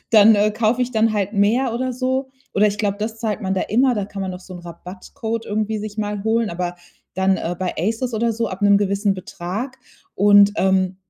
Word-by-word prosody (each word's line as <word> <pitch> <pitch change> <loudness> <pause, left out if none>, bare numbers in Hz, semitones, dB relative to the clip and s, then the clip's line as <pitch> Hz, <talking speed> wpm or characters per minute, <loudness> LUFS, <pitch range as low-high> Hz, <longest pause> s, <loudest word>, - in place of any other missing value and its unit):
dann, 220 0 +7
äh, 205 +1 +3
kaufe 220 +3 0
ich 250 0 -1
dann 220 0 +2
halt 205 0 -1
mehr 230 +5 +2
oder 255 +1 -2
so. 260 +1 -2 0.2
Oder 210 +2 +4
ich 205 +1 -4
glaube, 205 -2 0
das 220 +1 -4
zahlt 215 -3 -2
man 190 - -1
da 185 - 0
immer. 250 +3 +2
Da 205 -2 -2
kann 195 -1 -6
man 185 -1 -3
doch 180 - -8
so 185 0 -11
'n 175 - -8
Rabattcode 185 +6 -6
irgendwie 215 +1 -2
sich 215 0 -7
mal 205 -1 -3
holen, 225 0 +1
aber 175 0 -4 0.4
dann 190 +1 +2
äh, 175 +1 -3
bei 185 -1 -2
ASOS 225 +7 -1
oder 230 +1 +1
so 230 0 -2
ab 190 +2 -7
'nem 200 0 +5
gewissen 200 0 0
Betrag. 195 +8 -6 0.4
Und 205 0 +6
ähm, 190 -1 +1
210 Hz, 220 wpm, -21 LUFS, 190-225 Hz, 0.4 s, dann